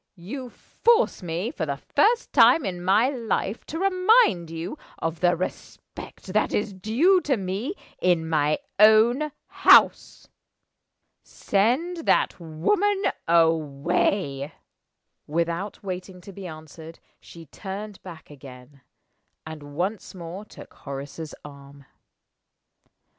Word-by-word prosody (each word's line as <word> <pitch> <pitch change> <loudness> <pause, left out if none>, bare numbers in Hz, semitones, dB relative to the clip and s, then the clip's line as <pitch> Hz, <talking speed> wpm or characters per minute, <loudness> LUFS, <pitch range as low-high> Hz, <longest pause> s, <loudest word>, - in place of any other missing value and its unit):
"You 245 +9 -7
force 465 - +1
me, 175 +6 -3
for 160 - -4
the 140 -1 -2
first 425 - +1
time 250 +3 +6
in 180 -2 -4
my 205 +7 +3
life, 230 -4 -3
to 320 - -6
remind 370 - +3
you 165 - -5 0.2
of 165 0 -3
the 175 -1 +3
respect 185 +2 -8
that 215 - +1
is 205 -1 -2
due 250 - +2
to 275 -6 0
me 200 - -4 0.3
in 175 -3 +2
my 155 -1 +1 0.2
own 230 +8 +5
house. - - +4 0.9
Send 255 - 0
that - - +2
woman 385 - 0 0.2
away." 160 -1 +1 0.7
Without 170 +6 -3
waiting 185 -1 -6
to 195 +2 -12
be 190 0 -8
answered, 160 0 -11 0.2
she 165 -1 -13
turned 200 +5 -8
back 165 -5 -12
again, 135 0 -14 0.6
and 155 -1 -8
once 190 +4 -3
more 180 +3 -8
took - - -14
Horace's 140 +3 -8
arm. 140 -1 -13
185 Hz, 115 wpm, -24 LUFS, 160-230 Hz, 0.9 s, time